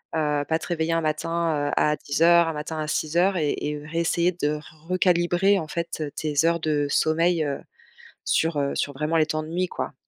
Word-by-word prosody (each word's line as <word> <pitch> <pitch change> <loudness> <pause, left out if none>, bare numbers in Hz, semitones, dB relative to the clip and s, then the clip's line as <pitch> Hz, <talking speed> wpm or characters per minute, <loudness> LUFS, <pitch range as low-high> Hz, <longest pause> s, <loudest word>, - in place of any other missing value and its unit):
Heu, 150 -2 +1
pas 160 - +1
te - - -8
réveiller 165 -1 -1
un 165 - +1
matin, 155 -1 -1
heu, - - -2
à 150 0 +3
10:00, 170 +3 +4
un 165 - -2
matin 155 +1 -5
à 155 - -3
6:00 175 +5 +1
et 150 -3 +1
et 150 - -3
heu, 150 0 -9
réessayer 170 +2 +1
de 150 -3 -1 0.3
recalibrer 180 +2 +3
en 155 - -5
faite, 170 0 -4
heu, 145 -2 -3
tes 150 -2 -3
heures 170 0 +2
de 150 -2 0
sommeil, 165 +2 +2
heu, 140 -1 -3 0.7
sur, 160 -2 +1
heu, 140 0 0
sur 145 - -1
vraiment 150 +4 -1
les 155 - +3
temps 155 0 -2
de - - -10
nuit, 180 +2 -1
quoi. - - -4
160 Hz, 215 wpm, -24 LUFS, 150-170 Hz, 0.7 s, 10:00